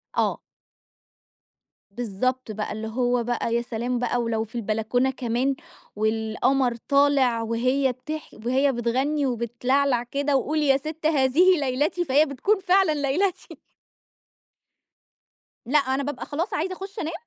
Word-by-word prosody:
آه. - - 0 1.5
بالضبط 245 +3 -2
بقى، 210 0 -4
اللي 220 +1 -5
هو 245 +1 0
بقى 235 -1 -1
يا 235 - +2
سلام 240 +1 -3
بقى 245 0 0
ولو 225 -1 -1
في 225 +2 -13
البلكونة 225 +3 0
كمان، 255 +1 -1 0.4
والقمر 225 +4 +1
طالع 275 -2 +2
وهي 255 +4 +1
بتح 305 +5 -7 0.2
وهي 265 +3 +3
بتغني 265 +5 0
وبتلعلع 245 +2 0
كده 280 +3 0
وقولي 300 +3 0
يا 270 0 +5
ست 310 +2 -7
هذه 315 +5 +4
ليلتي، 290 +6 0
فهي 290 +2 +4
بتكون 315 - 0
فعلًا 375 -3 +3
ليلتي. 300 +7 -1 2.1
لأ، 285 +6 +3
أنا 270 0 -1
بابقى 285 -1 -4
خلاص 335 +7 -3
عايزة 365 +4 -1
اخُش 390 +3 -8
أنام، 325 -2 -3
260 Hz, 130 wpm, -24 LUFS, 235-290 Hz, 2.1 s, يا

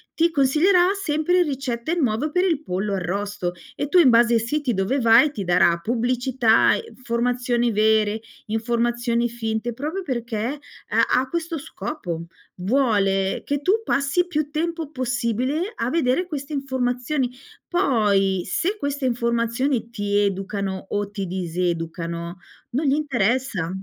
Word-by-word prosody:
ti 335 +1 +3
consiglierà 305 +6 +3 0.2
sempre 315 +1 +1
ricette 270 -1 -3
nuove 275 -1 0
per 360 +3 +2
il 320 -5 0
pollo 195 -2 -2
arrosto. 190 0 -2 0.2
E 285 - -2
tu 360 - +5
in 295 - +7
base 235 0 +5
ai - - +4
siti 255 +2 -1
dove 200 +9 0
vai, 235 +5 +6
ti 215 -8 -5
darà 170 -1 +3
pubblicità 245 0 +2
e 470 - -3
informazioni 240 0 0
vere, 215 0 +2 0.3
informazioni 235 +1 0
finte, 225 0 -3
proprio 305 +10 -4
perché 235 -7 -3 0.5
ha - - +2 0.2
ha 260 - -2
questo 335 +1 -3
scopo. 195 - -5 0.3
Vuole 195 -3 +1
che 285 0 -1
tu 400 +8 +2
passi 280 -1 +1
più 305 -4 -1
tempo 325 0 -2
possibile 255 - -1
a 230 - -1
vedere 290 +2 +1
queste 300 -3 -6
informazioni, 260 -1 -1 0.4
poi 205 - +2
se 390 +5 0
queste 285 -3 -2
informazioni 235 +1 0
ti 205 -3 -2
educano 195 -1 -2
o 205 0 -2
ti 200 -2 -4
diseducano 170 -1 -3 0.3
non 275 +6 -1
gli 275 - +3
interessa, 245 - 0
240 Hz, 135 wpm, -23 LUFS, 210-285 Hz, 0.5 s, in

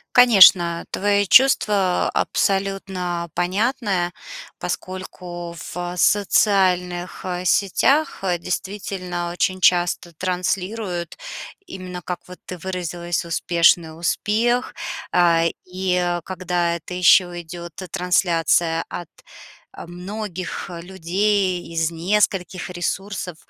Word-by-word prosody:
Конечно, 190 -8 +7
твои 205 0 +1
чувства 205 -4 +4
абсолютно 190 -3 -1
понятны, 190 0 0 0.5
поскольку 175 -2 -6 0.2
в 175 0 -4
социальных, 185 -3 +2
э, 180 0 -3
сетях, 270 - +2
э, 180 -2 +1
действительно 180 -1 -4
очень 185 +1 -1
часто 175 -1 +2
транслируют 185 +1 -3 0.5
именно, 180 - -8
как 180 +1 -4
вот 180 - -11
ты 180 -2 -7
выразилась, 175 -1 -3
успешный 170 -1 +2
успех. 235 +8 0 0.4
А, 170 -2 +4 0.2
и 180 -1 -1
когда 180 -2 -1
это 170 +2 -8
ещё 180 0 +5
идёт 170 0 -9
т 185 - -8
трансляция 170 -2 +1
от, 175 -3 -7 0.7
э, - - -8
многих 185 +1 -6
людей 185 +2 -1
из 165 0 +1
нескольких 185 +1 0
ресурсов, 180 0 -4
180 Hz, 95 wpm, -21 LUFS, 175-195 Hz, 0.7 s, Конечно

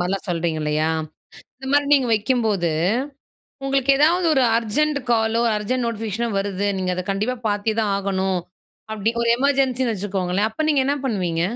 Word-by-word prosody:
மாரிலாம் 185 +2 -2
சொல்றீங்க 165 -2 -1
இல்லையா? 150 +1 0 0.7
இந்த 265 - -9
மாரி 290 0 +3
நீங்க 265 -4 +2
வைக்கும்போது, 215 -6 0 0.9
உங்களுக்கு 275 0 +2
ஏதாவது 340 +4 +3
1 265 - +3 0.2
அர்ஜெண்ட் 285 +7 0
காலோ 225 0 +2 0.2
அர்ஜெண்ட் 240 +4 -1
நோட்டிஃபிகேஷனோ 225 0 -2
வருது 200 0 -2
நீங்க 185 -1 -1
அத 185 - -3
கண்டிப்பா 215 +6 -1
பார்த்தே 205 +1 0
தான் 210 -2 0
ஆகணும். 190 -2 -1 0.5
அப்டி 220 +1 0
1 235 - 0
எமர்ஜென்சின்னு 260 -3 +1
வச்சுக்கோங்களேன். 195 0 -1
அப்ப 310 +8 -3
நீங்க 290 -3 +3
என்ன 285 - +2
பண்ணுவீங்க? 180 -8 -1
220 Hz, 150 wpm, -22 LUFS, 190-255 Hz, 0.9 s, மாரி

